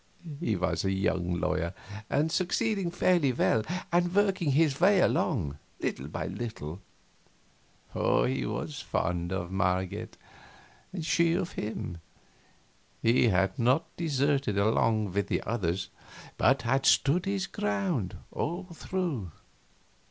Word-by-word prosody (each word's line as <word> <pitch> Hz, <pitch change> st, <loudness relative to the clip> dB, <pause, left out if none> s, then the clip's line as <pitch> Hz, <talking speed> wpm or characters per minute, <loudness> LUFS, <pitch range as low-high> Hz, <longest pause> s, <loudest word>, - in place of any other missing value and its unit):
He 110 Hz, -, 0 dB
was 90 Hz, -, -1 dB
a 95 Hz, -, +1 dB
young 90 Hz, -2 st, 0 dB
lawyer, 85 Hz, +3 st, -1 dB, 0.3 s
and 155 Hz, +3 st, +1 dB
succeeding 195 Hz, +1 st, 0 dB
fairly 170 Hz, -5 st, +3 dB
well 115 Hz, -2 st, +2 dB, 0.3 s
and 175 Hz, +1 st, +2 dB
working 190 Hz, -8 st, +2 dB
his 150 Hz, 0 st, +2 dB
way 195 Hz, +1 st, +6 dB
along, 80 Hz, -, +1 dB, 0.2 s
little -, -, -3 dB
by -, -, -4 dB
little. 100 Hz, -7 st, -5 dB, 1.1 s
He 130 Hz, +1 st, +1 dB
was 145 Hz, -2 st, -4 dB
very -, -, -16 dB
fond 85 Hz, 0 st, -2 dB
of 90 Hz, -1 st, -3 dB
Marget, 95 Hz, -1 st, -1 dB, 0.7 s
and 175 Hz, -4 st, -5 dB
she 165 Hz, 0 st, +3 dB
of 170 Hz, -, -1 dB
him. 90 Hz, -5 st, -5 dB, 1.0 s
He 120 Hz, +2 st, +4 dB
had 95 Hz, -2 st, +1 dB
not 130 Hz, +7 st, +2 dB
deserted 140 Hz, -, +1 dB
along 110 Hz, 0 st, +2 dB
with 100 Hz, +1 st, 0 dB
the -, -, -1 dB
others, 95 Hz, -4 st, -1 dB, 0.5 s
but 135 Hz, +1 st, +3 dB
had 135 Hz, +3 st, +1 dB
stood 155 Hz, +6 st, +4 dB
his 195 Hz, -1 st, 0 dB
ground 185 Hz, -, -2 dB
all 175 Hz, +5 st, -2 dB
through. 165 Hz, -, -3 dB
130 Hz, 125 wpm, -29 LUFS, -, 1.1 s, way